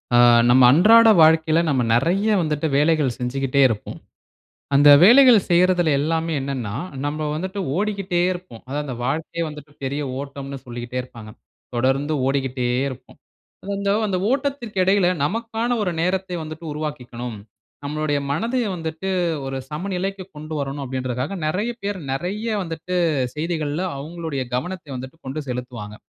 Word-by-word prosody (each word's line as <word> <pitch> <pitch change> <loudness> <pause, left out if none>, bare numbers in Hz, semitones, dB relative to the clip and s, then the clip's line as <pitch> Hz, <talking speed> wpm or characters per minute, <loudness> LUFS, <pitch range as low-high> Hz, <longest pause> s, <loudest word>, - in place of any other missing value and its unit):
ஆ, - - +6 0.3
நம்ம 130 +1 +6
அன்றாட 225 - +7
வாழ்க்கைல 160 0 +5
நம்ம 135 -4 +1
நெறைய 175 - +2
வந்துட்டு 155 -1 -1
வேலைகள் 150 -3 +2
செஞ்சிகிட்டே 135 +2 0
இருப்போம். 110 -4 -5 0.8
அந்த 145 +1 +6
வேலைகள் 245 +3 +8
செய்றதுல 175 -1 +3
எல்லாமே 165 +2 -1
என்னன்னா, 130 -7 -4 0.3
நம்ப 150 +2 -2
வந்துட்டு 190 +5 -4 0.2
ஓடிக்கிட்டே 195 -3 -1
இருப்போம். 175 -11 -10
அதாவது 145 +2 -3
அந்த 130 - -4
வாழ்க்கையே 155 +5 -2
வந்து 150 0 -8 0.2
பெரிய 140 +2 -2 0.2
ஓட்டம்னு 140 -1 -7
சொல்லிட்டே 120 +1 -5
இருப்பாங்க. 115 -3 -12 0.4
தொடர்ந்து 135 +5 +1
ஓடிக்கிட்டே 135 -2 -1 0.2
இருப்போம். 130 -1 -11 0.5
அது, 200 +1 -3 0.3
அந்த 185 -2 0
ஓட்டத்திற்கு 265 -6 -2
இடையில 190 -1 +3 0.2
நமக்கான 230 +6 -1
ஒரு 180 - -1
நேரத்த 180 0 -1
வந்துட்டு 155 +1 -8
உருவாக்கிக்கணும். 125 -6 -5 0.5
நம்மளுடைய 150 0 -1
மனதை 230 - 0
வந்துட்டு 165 +2 -5 0.4
ஒரு 135 0 -4
சமநிலைக்கு 190 +4 -3
கொண்டு 155 +1 -7
வரணும் 140 0 -4
அப்டின்றதுக்காக, 130 +4 -3
நெறைய 200 +9 -1
பேர் 200 -1 -2
நெறைய 185 +11 -3 0.2
வந்துட்டு, 165 +1 -5 0.4
செய்திகள்ல 155 0 -2 0.2
அவங்களுடைய 155 -2 -4
கவனத்தை 160 +4 -4
வந்துட்டு 130 +5 -9
கொண்டு 135 +4 -4
செலுத்துவாங்க. 120 -4 -6
155 Hz, 130 wpm, -22 LUFS, 135-185 Hz, 0.8 s, வேலைகள்